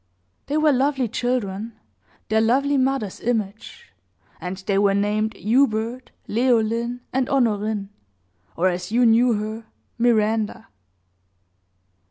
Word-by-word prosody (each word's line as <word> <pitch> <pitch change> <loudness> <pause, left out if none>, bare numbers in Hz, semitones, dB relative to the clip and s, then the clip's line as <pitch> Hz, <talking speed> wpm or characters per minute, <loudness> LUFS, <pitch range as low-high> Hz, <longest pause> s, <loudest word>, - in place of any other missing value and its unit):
They 290 - 0
were 310 -1 +4
lovely 270 -1 +1
children 230 -2 -3 0.5
their 220 0 +3
lovely 275 +6 +2
mother's 260 -7 0
image; 220 - -4 0.5
and 180 +1 -5
they 195 +1 0
were 200 -1 +3
named 210 +2 0
Hubert, 235 +1 0 0.2
Leoline, 235 0 +1
and 260 0 0
Honorine, 215 -5 0 0.7
or, 180 - +2
as 180 +1 -2
you 245 +2 +3
knew 235 +2 +4
her, 215 +1 -4 0.3
Miranda. 220 -2 +1
225 Hz, 110 wpm, -22 LUFS, 210-250 Hz, 0.7 s, were